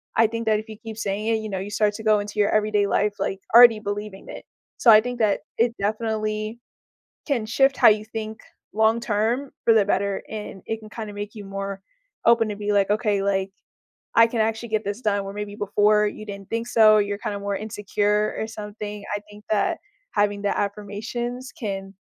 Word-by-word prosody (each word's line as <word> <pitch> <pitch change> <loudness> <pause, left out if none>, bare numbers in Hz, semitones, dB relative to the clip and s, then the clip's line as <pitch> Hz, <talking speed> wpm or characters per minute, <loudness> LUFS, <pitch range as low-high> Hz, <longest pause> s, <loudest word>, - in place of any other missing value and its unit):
I 225 -1 +5
think 230 0 -4
that 215 -1 +3
if 215 - -9
you 215 - -8
keep 220 -1 -9
saying 210 0 -2
it, 225 - +3
you 220 -1 -4
know, 190 -1 -3
you 195 +2 -5
start 210 0 +2
to 220 - -7
go 215 -1 +4
into 205 +1 -5
your 205 - +4
everyday 210 -1 +2
life, 205 0 +1
like, 195 0 -2 0.2
already 235 -3 +9
believing 205 -1 -6
it. - - -9 0.3
So 235 - +6
I 215 - +9
think 245 0 -5
that 210 -3 +2 0.2
it 235 +1 +2
definitely 215 +1 -2 0.7
can 245 -7 0
shift 270 +4 +2
how - - +7
you 215 0 +1
think 220 0 -6 0.3
long-term 225 +3 +1
for 230 - +6
the 210 -3 +4
better, 200 -1 0
and 210 -3 -7
it 225 0 -2
can 215 -1 -12
kinda 220 -2 -7
make 205 +1 -6
you 205 -2 -8
more 195 0 -5 0.4
open 230 -2 +4
to 205 - -3
be 210 0 -2
like, 200 -1 +3
"Okay, 210 -2 +1
like, 195 -1 0 0.6
I 230 0 +7
can 230 -1 -3
actually 225 +1 -1
get 215 0 0
this 205 +4 -4
done," 205 -3 0
where 195 - -6
maybe 205 0 -5
before 210 +1 +3
you 215 +1 -7
didn't 200 -2 -9
think 230 +1 -2
so 215 -2 +6
or 210 - +5
you're 205 0 -2
kinda 205 -1 -4
more 200 0 -2
insecure 210 0 -1
or 220 - -2
something. 210 -1 -7
I - - -2
think 210 0 -14
that 220 - +1 0.3
having 205 0 +1
the 200 - 0
affirmations 220 +5 -4
can 195 -3 -4
210 Hz, 210 wpm, -24 LUFS, 205-225 Hz, 0.7 s, already